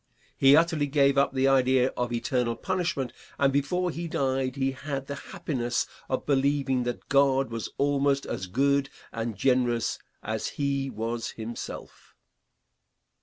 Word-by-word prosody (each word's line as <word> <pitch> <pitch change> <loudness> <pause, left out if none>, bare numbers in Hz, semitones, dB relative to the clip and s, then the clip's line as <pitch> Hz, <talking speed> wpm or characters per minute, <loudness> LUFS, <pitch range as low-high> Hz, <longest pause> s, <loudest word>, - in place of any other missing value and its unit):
He 135 +1 +6
utterly 160 -2 +3
gave 140 -1 +3
up 140 0 +3
the 135 0 +2
idea 130 -1 +4
of 125 -1 -3
eternal 120 0 0
punishment, 175 -9 -2 0.2
and 135 -1 +3
before 175 +6 0
he 170 +2 -4
died 135 -5 -1
he 135 -1 0
had 135 0 -5
the 140 - -5 0.2
happiness 130 -10 -1 0.2
of 130 - -1
believing 140 -2 +2
that 120 - -4
God 135 -2 +3
was 115 -1 -4
almost 140 0 +2
as 95 - -4
good 140 +6 +2 0.2
and 115 -2 -4
generous 125 -1 +1 0.2
as 110 0 -2
he 140 -1 0
was 115 0 -3
himself. 115 +1 -8
135 Hz, 140 wpm, -27 LUFS, 125-140 Hz, 0.2 s, He